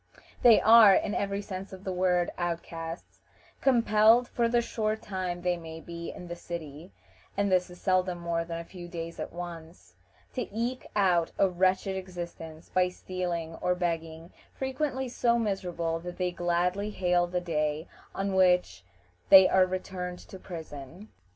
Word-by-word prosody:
They 235 -3 +7
are, 220 -3 +8
in 205 - 0
every 200 0 -2
sense 190 0 -7
of 190 0 -10
the 190 - -3
word, 180 -1 +1
outcasts; 165 -1 -5 0.4
compelled, 230 -1 +5
for 235 -1 0
the 240 0 +3
short 220 -2 -1
time 185 -3 -4
they 180 -1 +1
may 160 -1 -8
be 170 0 -7
in 180 - -10
the 175 - -5
city 165 -1 -8 0.5
and 200 -1 +1
this 180 0 +2
is 180 0 -12
seldom 185 -1 +1
more 170 -1 -2
than 165 0 -5
a 170 - -5
few 175 0 -10
days 170 -1 -6
at - - -5
once 165 - -9 0.4
to 250 - -3
eke 235 +4 -3
out 180 -5 +3
a 195 - +4
wretched 185 +1 +1
existence 175 -3 -7
by 185 0 +2
stealing 175 -3 -4
or 180 - +1
begging; 165 -1 -3 0.2
frequently 265 0 -2
so 235 -1 +1
miserable 180 -6 -2
that 175 +1 -8
they 180 -1 0
gladly 175 +4 0
hail 180 -3 +1
the 180 0 -1
day 155 -2 -2 0.3
on 195 0 -1
which 180 - +3 0.5
they 190 -1 +10
are 185 -1 +4
returned 180 -1 -4
to 190 - -12
prison. 160 +2 -9
180 Hz, 160 wpm, -28 LUFS, 170-195 Hz, 0.5 s, they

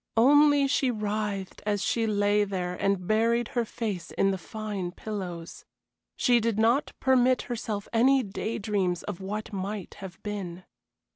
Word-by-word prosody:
Only 290 +3 +6
she 270 -1 +2
writhed 210 -3 -3
as 205 -1 0
she 225 -1 +1
lay 205 0 +2
there 185 -3 -3
and 195 0 0
buried 230 +3 +2
her 240 - 0
face 205 -7 -4
in 195 - +1
the 190 - -2
fine 205 -1 -5
pillows. 180 -4 -6 0.5
She 245 -2 +4
did 230 -2 0
not 235 +6 +2
permit 255 -1 +3
herself 220 -4 -4
any 260 +3 +4
day 215 +2 -4
dreams 195 -4 -1
of 195 -3 -6
what 210 +3 -5
might 195 +1 -4
have 190 -3 -8
been. 185 -4 -5
210 Hz, 150 wpm, -27 LUFS, 195-230 Hz, 0.5 s, Only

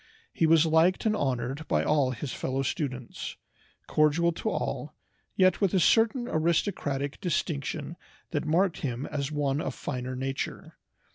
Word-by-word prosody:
He 165 - +2
was 165 0 +5
liked 165 +5 +3
and 215 -1 +3
honored 135 - -2
by - - +2
all 145 -4 +2
his 130 +2 -4
fellow 135 +1 -2
students, 130 -5 -4 0.5
cordial 155 +3 +3
to 160 - -3
all, - - -3 0.4
yet 185 +1 +3
with 195 -2 +2
a - - +5
certain 225 +6 +3
aristocratic 155 - 0
distinction 155 -3 -2 0.4
that 150 -4 -1
marked 170 +3 +2
him 130 -1 -3
as 145 -1 -3
one 145 -1 0
of - - -3
finer 130 -2 -4
nature. 135 +1 -4
150 Hz, 145 wpm, -28 LUFS, 135-170 Hz, 0.5 s, was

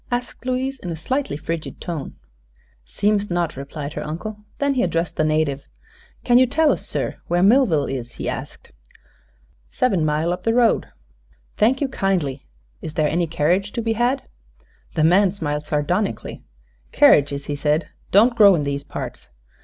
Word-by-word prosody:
asked 245 0 -4
Louise, 260 +1 -1
in 180 - -6
a 165 - -3
slightly 260 - -2
frigid 165 +1 -5
tone. 165 -5 -5 0.7
"Seems 205 - 0
not," 175 -2 -1
replied 140 +2 -6
her - - -4
uncle. 210 +7 -6
Then 280 0 +1
he 255 - +1
addressed 165 -2 -1
the - - +1
native. 155 -3 +1 0.6
"Can 245 0 +5
you 255 - +5
tell 300 +4 +3
us, - - -3
sir, - - -3
where 175 +1 +2
Millville 200 - +4
is?" 125 -3 -5
he - - -6
asked. - - -6 1.0
"Sev'n 200 -10 +1
mile 155 +3 +1
up 180 - -6
the 225 0 0
road." 240 -2 +3 0.7
"Thank 245 +6 +2
you 280 - +2
kindly. 180 - -1 0.3
Is 155 - -7
there 155 -1 +2
any 170 +3 0
carriage 175 +6 0
to 235 - -2
be 225 0 +1
had?" 245 +4 0 0.7
The 155 - +2
man 185 +4 +5
smiled 150 -5 -3
sardonically. 175 +7 -1 0.5
"Kerridges," 140 -1 +4
he 145 - -3
said, 150 +2 0 0.2
"don't 230 +5 +5
grow 200 -4 +7
in 150 - -1
these 140 0 -3
parts. - - -7
175 Hz, 165 wpm, -21 LUFS, 150-230 Hz, 1.0 s, grow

